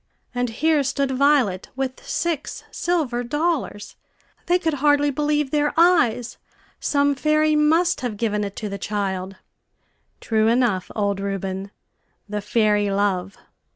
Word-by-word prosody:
And 245 0 -1
here 305 +6 +2
stood 275 0 -1
Violet 260 -8 +2
with 265 -1 -4
six 325 -4 -3
silver 290 -9 -1
dollars! 295 -5 -2 0.5
They 355 - +4
could 330 -3 -1
hardly 290 -1 +3
believe 295 -1 0
their 295 -1 +1
eyes. 245 -9 +3 0.4
Some 285 0 +2
fairy 305 +2 +2
must 315 +3 +3
have 240 -5 -3
given 210 -2 -1
it 200 -1 -5
to 215 - -4
the 200 -1 -5
child. 195 -2 -3 0.8
True 220 -1 +1
enough, 230 -5 +1
old 200 -2 0
Reuben 195 0 -4 0.6
the 210 0 -3
fairy 210 -1 +2
LOVE! 195 -1 -1
245 Hz, 130 wpm, -22 LUFS, 205-295 Hz, 0.8 s, They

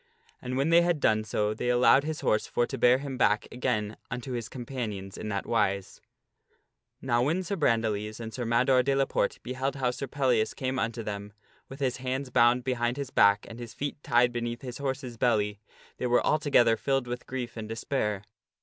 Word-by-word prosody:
And 125 0 -3
when 140 +4 +1
The 165 - +6
Lad - - +7
they - - +1
had 170 -3 +1
done 110 -5 +2
so 105 0 -1
they 120 +3 -2
allowed 125 +3 +5
his 155 0 -4
horse 105 - +1
for 120 - +1
to 135 - -5
bear 125 0 +5
him 135 -1 -6
back 105 -2 +3
Ettardputs - - -14
again 110 -4 -1
unto 125 +2 -5
his 120 -1 -4
companions 115 -7 -5
in 110 - -5
that 100 -1 -2
wise. 100 -4 -1
^^PeUias. - - -45 0.5
Now 120 -2 +2
when 160 +9 +1
Sir 200 +3 -2
Brandiles 110 - 0
and 110 -1 -6
Sir 125 - -4
Mador 125 +3 +3
de 135 +2 +1
la 135 0 +3
Porte - - -1
beheld 130 +2 -2
how 130 -3 0
Sir 135 +2 -5
Pellias 125 -5 +1
came 130 0 -2
unto 115 0 -2
them 100 -1 -6 0.4
with 135 +2 -10
his 130 -2 0
hands 130 +1 -3
bound 120 +1 +4
behind 120 -1 -1
his 140 -2 -4
back 100 0 +4
and 115 - -10
his 120 -2 -8
feet 145 0 -4
tied 120 -1 +3
beneath 120 0 -3
his 125 0 -6
horse's 130 -3 -4
belly, 105 -4 +1 0.4
they 125 - -1
were 120 0 +3
altogether 140 -7 +4
filled 135 +2 0
with 120 0 -6
grief 125 -3 -5
and 110 -1 -6
despair. 110 -3 -2
125 Hz, 215 wpm, -28 LUFS, 115-135 Hz, 0.5 s, Lad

